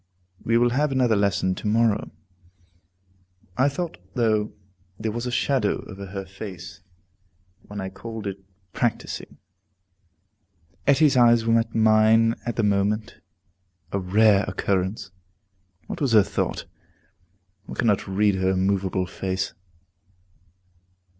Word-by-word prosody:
We 115 +1 +2
will 120 0 +3
have 145 +3 +1
another 125 -4 +2
lesson 100 -2 +1
to 105 - -5
morrow. 110 0 +2 1.5
I 130 +6 +3
thought, 165 - -5 0.2
though, 110 -3 +1 0.5
there 110 0 -2
was 120 +3 -4
a - - -3
shadow 125 -4 0
over 100 -1 -9
her 95 0 -6
face 95 -2 -9 0.9
when 105 0 -7
I 95 0 -4
called 110 +2 -8
it 95 -1 -5 0.3
practising. 120 -2 -3 1.5
Etty's 145 0 +5
eyes 120 -2 +5
met 115 0 +1
mine 110 +1 +4
at 120 - -2
the 115 - 0
moment, 105 +2 0 0.7
a 100 - -1
rare 100 +2 +4
occurrence. 95 +1 -2 0.7
What - - -7
was 135 -5 +1
her 105 -2 +7
thought? - - -3 1.0
One - - -7
cannot 105 -5 +1
read 100 +2 +2
in - - -3
her 95 - +2
immovable 95 0 0
face. 95 +1 -3
105 Hz, 120 wpm, -24 LUFS, 95-115 Hz, 1.5 s, her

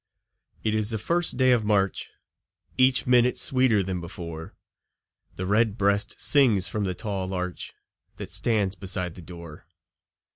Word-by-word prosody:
It 110 - 0
is 110 -1 +1
the 110 - 0
first 170 +10 0
day 130 -1 +4
of 120 -3 +3
March, 100 -2 0 0.7
Each 130 0 +3
minute 125 0 +3
sweeter 130 -6 +2
than 90 -1 -4
before; 85 -2 -8 0.8
The 95 - -4
red 105 +2 +1
breast 100 +1 0
sings 115 -10 +3
from 105 0 -3
the 90 -1 -3
tall 100 -2 -4
larch 90 -1 -5 0.4
That - - -8
stands 105 -5 0
beside 90 -1 -2
the 90 - -12
door. 85 -2 -12
100 Hz, 145 wpm, -25 LUFS, 90-115 Hz, 0.8 s, day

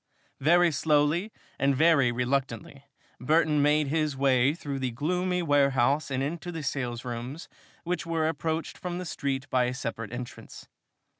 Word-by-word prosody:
Very 170 +4 +4
slowly 150 +6 +1 0.3
and 140 0 +2
very 140 -4 +4
reluctantly 130 +1 -2 0.3
Burton 150 +2 +2
made 150 0 +3
his 155 -2 0
way 135 +1 +3
through 140 -5 -5
the 130 -1 -1
gloomy 180 +8 -1
warehouse 140 -1 +2
and 135 0 -1
into 170 +4 -4
the 165 -3 -6
salesrooms, 125 +2 -4 0.4
which 180 +1 -2
were 165 -2 0
approached 160 +1 -3
from 175 -1 -4
the 180 - -5
street 140 -4 -3
by 125 -1 +3
a 125 +1 -2
separate 115 -4 -5
entrance. 120 0 -8
145 Hz, 145 wpm, -27 LUFS, 130-160 Hz, 0.4 s, Very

